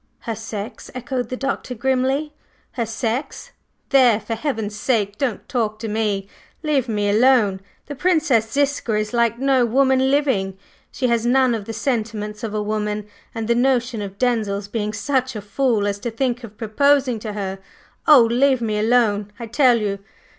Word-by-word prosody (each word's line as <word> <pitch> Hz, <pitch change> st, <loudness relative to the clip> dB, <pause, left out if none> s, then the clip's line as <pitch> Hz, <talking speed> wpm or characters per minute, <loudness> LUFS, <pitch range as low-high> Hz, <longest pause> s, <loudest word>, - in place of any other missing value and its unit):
"Her 230 Hz, -, -3 dB
sex!" 220 Hz, +1 st, -7 dB
echoed 255 Hz, -1 st, -3 dB
the 255 Hz, -, -4 dB
Doctor 270 Hz, -1 st, -3 dB
grimly. 265 Hz, +4 st, 0 dB, 0.4 s
"Her 235 Hz, -3 st, -3 dB
sex! 230 Hz, +4 st, -3 dB, 0.4 s
There! 250 Hz, -6 st, +5 dB
for 220 Hz, +1 st, -5 dB
heaven's 225 Hz, -4 st, -3 dB
sake 210 Hz, -2 st, 0 dB
don't 255 Hz, -6 st, -2 dB
talk 220 Hz, -5 st, -1 dB
to 225 Hz, +1 st, -5 dB
me! 210 Hz, -2 st, -1 dB, 0.4 s
leave 280 Hz, -5 st, +1 dB
me 210 Hz, -2 st, 0 dB
alone! 215 Hz, -3 st, +3 dB, 0.2 s
The 290 Hz, -, -6 dB
Princess 295 Hz, -8 st, +2 dB
Ziska 280 Hz, -5 st, 0 dB
is 215 Hz, +2 st, -2 dB
like 235 Hz, -1 st, +2 dB
no 265 Hz, -1 st, +3 dB
woman 265 Hz, +2 st, +3 dB
living; 260 Hz, -10 st, +1 dB, 0.3 s
she 260 Hz, -, -3 dB
has 235 Hz, -1 st, +1 dB
none 255 Hz, +1 st, +3 dB
of 220 Hz, -3 st, -3 dB
the 225 Hz, -, -5 dB
sentiments 215 Hz, -4 st, -3 dB
of 215 Hz, -2 st, -3 dB
a 210 Hz, -, -1 dB
woman, 210 Hz, 0 st, -2 dB, 0.3 s
and 225 Hz, -1 st, -3 dB
the 235 Hz, -, +3 dB
notion 245 Hz, -2 st, +1 dB
of 200 Hz, -1 st, -7 dB
Denzil's 215 Hz, -5 st, 0 dB
being 210 Hz, 0 st, -2 dB
such 260 Hz, +3 st, -1 dB
a -, -, -3 dB
fool 215 Hz, +1 st, 0 dB
as 205 Hz, 0 st, -2 dB
to 235 Hz, -, -3 dB
think 245 Hz, +1 st, -2 dB
of 215 Hz, -2 st, -10 dB
proposing 260 Hz, +2 st, +2 dB
to 215 Hz, -1 st, -6 dB
her 195 Hz, -2 st, -4 dB, 0.5 s
Oh, 295 Hz, -6 st, +8 dB
leave 255 Hz, +3 st, +3 dB
me 215 Hz, -2 st, -1 dB
alone, 215 Hz, -3 st, +2 dB
I 235 Hz, -, -5 dB
tell 240 Hz, +1 st, +4 dB
you! 200 Hz, -2 st, -2 dB
230 Hz, 175 wpm, -21 LUFS, 210-260 Hz, 0.5 s, Oh